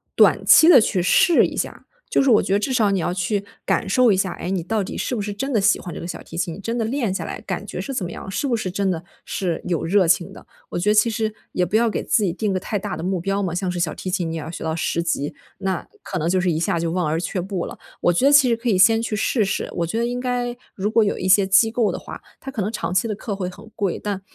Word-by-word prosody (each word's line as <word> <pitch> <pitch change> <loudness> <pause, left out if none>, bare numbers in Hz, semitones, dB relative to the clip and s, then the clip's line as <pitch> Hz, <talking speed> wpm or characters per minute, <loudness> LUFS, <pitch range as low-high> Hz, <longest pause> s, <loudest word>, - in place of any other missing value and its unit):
短 - - +4
期 320 - +8
地 300 -9 +9
去 190 -3 +1
试 345 - +5
一 - - -5
下， - - -4 0.2
就 - - +3
是 275 - +2
我 215 - +6
觉 190 - -1
得 200 - +3
至 260 +5 -2
少 225 -5 +3
你 195 - +1
要 175 +1 -1
去 195 +3 -1 0.2
感 - - 0
受 240 +4 +4
一 190 - +2
下， 190 -2 0
诶， 175 - -6
你 185 -3 -1
到 215 +3 -1
底 - - -6
是 250 - -2
不 220 - -2
是 205 +1 -3
真 270 +7 -3
的 215 - +3
喜 200 +2 +3
欢 175 - -7
这 - - -7
个 170 - -6
小 180 - -6
提 - - -12
琴， 170 -1 -2
你 - - -11
真 230 +4 -3
的 - - +1
练 235 -4 -1
下 - - -3
来 - - -6
感 - - -4
觉 - - -6
是 275 - -4
怎 250 - -2
么 175 - -4
样？ 190 - -8
是 200 +9 -1
不 240 -3 +1
是 190 -4 -3
真 195 +1 0
的， 170 -2 -2 0.2
是 175 -4 -3
有 170 -2 -1
热 185 +1 +3
情 180 +2 +2
的。 - - -14 0.2
我 - - -3
觉 195 +4 +1
得 210 - +4
其 230 +2 +4
实 220 0 -1 0.2
也 180 - 0
不 180 - -3
要 235 +1 +4
给 - - -2
自 215 - +2
己 180 -4 0
定 210 +2 -1
个 185 - 0
太 205 +3 -3
大 195 -5 -4
的 160 - -6
目 185 0 -1
标 195 +2 -1
嘛， 175 -4 -2
像 180 +1 -1
是 180 - -4
小 170 -2 0
提 185 - -6
琴， 180 -3 -1
你 - - -4
要 160 0 -6
学 170 - -7
到 160 0 -1
10 170 +1 -1
级， 150 -4 -2 0.2
那 190 -2 -2
可 190 - -5
能 160 -1 -1
就 185 +1 +2
是 180 -1 +1
一 160 - -1
下 170 0 0
就 165 0 -1
望 180 0 0
而 155 +2 0
却 180 +2 -3
步 185 -1 -3
了。 - - -9 0.2
我 175 - +4
觉 175 +10 +1
得 280 - +6
其 285 -3 +6
实 230 - +2
可 235 +2 -6
以 200 - +3
先 225 +4 +6
去 225 -1 -2
试 220 +1 +1
试， 195 - -2
我 170 - 0
觉 195 +8 -2
得 235 - +1
应 245 +1 -3
该 245 -1 -2 0.2
如 200 +2 -2
果 225 +1 +4
有 205 - -1
一 185 - -2
些 190 +1 +5
机 195 +4 +5
构 225 -1 +1
的 - - -5
话， - - -9 0.2
它 270 - -7
可 225 -7 -2
能 210 - -2
长 215 - -3
期 190 +5 +2
的 215 - -2
课 205 0 -5
会 190 -2 -3
很 200 +4 -13
贵， 200 -4 -1
但， 200 -2 -4
195 Hz, 340 characters per minute, -22 LUFS, 180-225 Hz, 0.2 s, 地